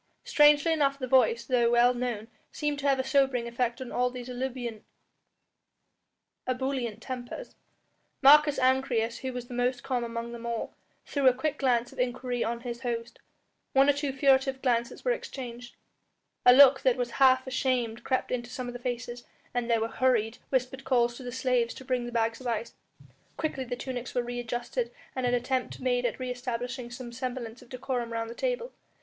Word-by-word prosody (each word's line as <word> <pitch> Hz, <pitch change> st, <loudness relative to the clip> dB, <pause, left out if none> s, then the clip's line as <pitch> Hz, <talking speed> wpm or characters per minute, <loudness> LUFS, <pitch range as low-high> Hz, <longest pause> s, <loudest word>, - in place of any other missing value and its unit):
Strangely 295 Hz, +2 st, +5 dB
enough 280 Hz, -3 st, +2 dB
the 265 Hz, -, -3 dB
voice, 245 Hz, -2 st, +3 dB
though 240 Hz, -1 st, +3 dB
well 240 Hz, +1 st, +5 dB
known, 240 Hz, -3 st, -3 dB, 0.2 s
seemed 295 Hz, -1 st, -2 dB
to 285 Hz, -, -1 dB
have 270 Hz, -, +3 dB
a -, -, +1 dB
sobering 265 Hz, -3 st, +2 dB
effect 235 Hz, +1 st, -1 dB
on 260 Hz, -2 st, -7 dB
all 250 Hz, 0 st, +1 dB
these 250 Hz, -1 st, -8 dB
ebullient 245 Hz, -3 st, -4 dB, 2.2 s
tempers. 255 Hz, -, -7 dB, 0.7 s
Marcus 295 Hz, +1 st, +7 dB
Ancyrus, 255 Hz, -3 st, +1 dB
who 260 Hz, -, -4 dB
was 250 Hz, -1 st, -6 dB
the 245 Hz, -, -9 dB
most 245 Hz, 0 st, 0 dB
calm 250 Hz, -2 st, -1 dB
among 235 Hz, 0 st, -4 dB
them 235 Hz, 0 st, -8 dB
all, 235 Hz, -1 st, -3 dB, 0.3 s
threw 280 Hz, -2 st, +1 dB
a 255 Hz, -, +7 dB
quick 290 Hz, +4 st, -2 dB
glance 245 Hz, -3 st, +1 dB
of -, -, -13 dB
inquiry 250 Hz, 0 st, -1 dB
on 235 Hz, 0 st, -3 dB
his 240 Hz, -1 st, -5 dB
host, 235 Hz, -2 st, -4 dB, 0.5 s
one 270 Hz, +1 st, +5 dB
or 285 Hz, -, +6 dB
two 285 Hz, 0 st, -2 dB
furtive 270 Hz, -1 st, +2 dB
glances 235 Hz, -2 st, 0 dB
were -, -, +3 dB
exchanged, 250 Hz, -, -6 dB, 0.7 s
a -, -, +11 dB
look 265 Hz, +1 st, +8 dB
that 260 Hz, -2 st, +3 dB
was 245 Hz, -1 st, -2 dB
half 260 Hz, -1 st, +6 dB
ashamed 250 Hz, -3 st, -1 dB
crept 260 Hz, -, -1 dB
into 240 Hz, -1 st, -2 dB
some 255 Hz, 0 st, -5 dB
of 245 Hz, -, -5 dB
the 245 Hz, -, -7 dB
faces, 245 Hz, 0 st, -4 dB, 0.3 s
and 245 Hz, -1 st, -1 dB
there 230 Hz, -1 st, +3 dB
were 225 Hz, -, +1 dB
hurried, 235 Hz, -2 st, +1 dB
whispered 260 Hz, 0 st, -1 dB
calls 240 Hz, -3 st, +2 dB
to 265 Hz, -, -10 dB
the 250 Hz, -1 st, -6 dB
slaves 250 Hz, -2 st, 0 dB
to 265 Hz, -, -10 dB
bring 250 Hz, -2 st, -1 dB
the -, -, -6 dB
bags 230 Hz, 0 st, 0 dB
of 255 Hz, -, -5 dB
ice. 230 Hz, -1 st, -2 dB, 0.6 s
Quickly 275 Hz, -4 st, -2 dB
the 245 Hz, 0 st, -3 dB
tunics 250 Hz, -1 st, -6 dB
were 245 Hz, -, +1 dB
re 245 Hz, 0 st, -4 dB
adjusted 240 Hz, -, -3 dB, 0.3 s
and 260 Hz, -1 st, 0 dB
an 245 Hz, -, +2 dB
attempt 255 Hz, +1 st, -2 dB
made 245 Hz, -1 st, +1 dB
at 230 Hz, -, -4 dB
re 255 Hz, -1 st, -3 dB
establishing 245 Hz, 0 st, -4 dB
some 240 Hz, 0 st, -8 dB
semblance 245 Hz, -1 st, -5 dB
of 245 Hz, -, -17 dB
decorum 250 Hz, -2 st, -3 dB
round 230 Hz, 0 st, -3 dB
the -, -, -6 dB
table. -, -, -2 dB
250 Hz, 190 wpm, -28 LUFS, 240-265 Hz, 2.2 s, a